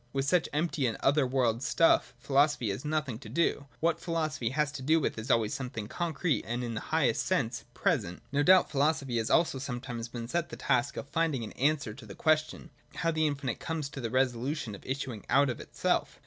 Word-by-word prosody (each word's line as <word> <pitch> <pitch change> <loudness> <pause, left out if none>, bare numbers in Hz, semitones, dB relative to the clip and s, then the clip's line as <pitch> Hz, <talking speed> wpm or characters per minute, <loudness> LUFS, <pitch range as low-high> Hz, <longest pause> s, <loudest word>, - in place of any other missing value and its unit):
With 135 0 0
such 175 +3 +2
empty 150 -3 0
and 115 - -2
other 140 -1 +3
world 125 -3 +1
stuff 140 -1 +3
philosophy 135 -2 +2
has 100 - -5
nothing 150 -6 -2
to 135 - -10
do. 155 -4 0
What 165 +1 +2
philosophy 155 -8 -1
has 150 +3 0
to 140 -2 -7
do 160 +5 +3
with 150 - -1
is 110 +5 -7
always 115 -1 +2
something 125 -6 -4
concrete 165 +1 -1
and 120 +2 -2
in 120 -1 -3
the 110 - -2
highest - - +1
sense - - -1
present. 85 +1 0
No 140 +1 +2
doubt 185 +4 +5
philosophy 140 -3 +1
has 115 0 -1
also 160 -5 +3
sometimes 125 -3 -5
been 120 -1 -6
set 170 +5 -1
the - - -7
task 125 +3 0
of - - -5
finding 155 -5 0
an 110 - -6
answer 140 -5 0
to 115 -2 -12
the 100 - -9
question, 155 -1 0 0.2
how 165 - 0
the 155 -1 +2
infinite 140 -5 -3
comes 160 -3 -3
to 140 - -7
the 115 - -2
resolution 130 0 0
of 100 - -10
issuing 130 -5 -4
out 140 -1 +4
of 120 - -7
itself. - - -1
140 Hz, 210 wpm, -30 LUFS, 120-155 Hz, 0.2 s, doubt